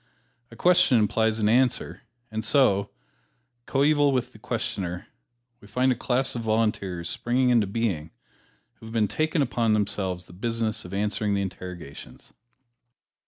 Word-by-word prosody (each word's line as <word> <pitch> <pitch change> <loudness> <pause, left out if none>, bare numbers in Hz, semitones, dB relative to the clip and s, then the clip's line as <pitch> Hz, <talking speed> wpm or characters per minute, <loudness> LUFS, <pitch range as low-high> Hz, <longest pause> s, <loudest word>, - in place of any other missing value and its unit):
A - - -13
question 175 -8 +4
implies 110 +1 +2
an 105 -2 +1
answer 125 +3 +1 0.3
and 110 0 -3
so, 110 -5 +3 0.8
coeval 145 +1 +3
with 130 -2 -1
the - - -15
questioner, 90 -1 -3 0.5
we 100 - -16
find 125 +5 +1
a - - +1
class 130 +2 0
of 120 - -4
Volunteers 105 -6 -1
springing 125 +6 +1
into 115 -4 +3
being, 95 -7 -2 0.7
who 110 - -11
have 110 -2 +1
taken 155 -1 +1
upon 120 -3 +1
themselves 95 -4 0
the 85 - -15
business 115 +2 -2
of 90 - -9
answering 105 0 0
the 100 - 0
interrogations. 90 -6 -9
110 Hz, 140 wpm, -25 LUFS, 100-125 Hz, 0.8 s, question